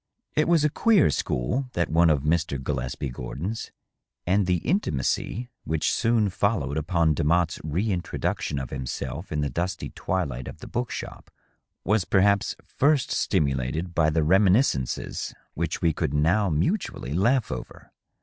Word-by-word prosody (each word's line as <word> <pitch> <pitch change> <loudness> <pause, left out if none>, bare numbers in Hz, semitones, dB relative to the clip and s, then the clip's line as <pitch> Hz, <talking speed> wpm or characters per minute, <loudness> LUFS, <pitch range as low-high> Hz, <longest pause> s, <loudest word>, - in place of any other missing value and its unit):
It 155 +1 +3
was 165 -3 +4
a 150 - +2
queer 220 -4 +4
school, 125 - -1
that 85 -2 0
one 85 +1 +5
of 75 -3 +2
Mr. 80 -2 0
Gillespie 65 0 -3
Gordon^s, 80 - -5 0.6
and 95 +1 +2
the 90 -1 +3
intimacy 120 - -1
which 80 -1 0
soon 115 -3 +2
followed 90 - 0
upon 80 0 +2
Demotte's 85 +3 +1
re 90 +8 -1
introduction 85 -4 -2
of 65 -2 -4
himself 70 +5 -5
in 75 -1 0
the 70 - 0
dusty 90 +2 -3
twilight 70 -9 -3
of - - -8
the - - -11
book 120 +1 -3
shop - - -7 0.5
was 105 -2 +2
perhaps 100 0 +3
first 145 -1 +1
stimulated 75 +1 0
by 80 -2 +3
the 80 0 +1
reminiscences 95 - +2 0.2
which 85 0 -3
we 85 -2 +3
could 75 - -2
now 90 +7 +3
mutually 80 - -1
laugh 115 - +2
over. - - -8
85 Hz, 150 wpm, -25 LUFS, 75-105 Hz, 0.6 s, one